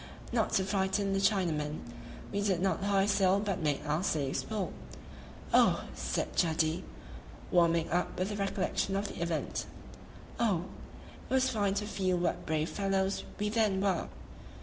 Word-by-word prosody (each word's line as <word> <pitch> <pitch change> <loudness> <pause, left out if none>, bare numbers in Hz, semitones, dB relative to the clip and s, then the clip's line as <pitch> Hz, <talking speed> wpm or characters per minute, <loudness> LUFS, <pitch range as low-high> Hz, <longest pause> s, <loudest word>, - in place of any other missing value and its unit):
Not 230 -3 +1
to 190 - +3
frighten 195 0 0
the 195 - +2
Chinamen, 165 -7 +1 0.5
we 200 - -1
did 195 -4 +1
not 190 +1 0
hoist 200 0 +3
sail 195 0 +4
but 200 -3 -2
made 150 -2 0
our 150 +2 0
slaves 140 -7 0
pull. 210 -5 -3 0.8
"Oh!" - - +5
said - - -2
Jadee, 160 +1 +1 0.7
warming 170 -2 +4
up 175 +1 0
with 185 +2 0
the 210 - -3
recollection 195 -1 -1
of 200 +1 -1
the - - -7
event 170 -2 -2 0.7
"oh! 195 -7 +2 0.6
it - - -15
was 260 0 +3
fine 205 -3 +1
to 205 +1 -1
feel 190 -3 0
what 175 0 -1
brave 155 0 0
fellows 195 -1 0
we 210 0 0
then 210 -3 +2
were!" 190 -3 +1
195 Hz, 155 wpm, -31 LUFS, 170-200 Hz, 0.8 s, Oh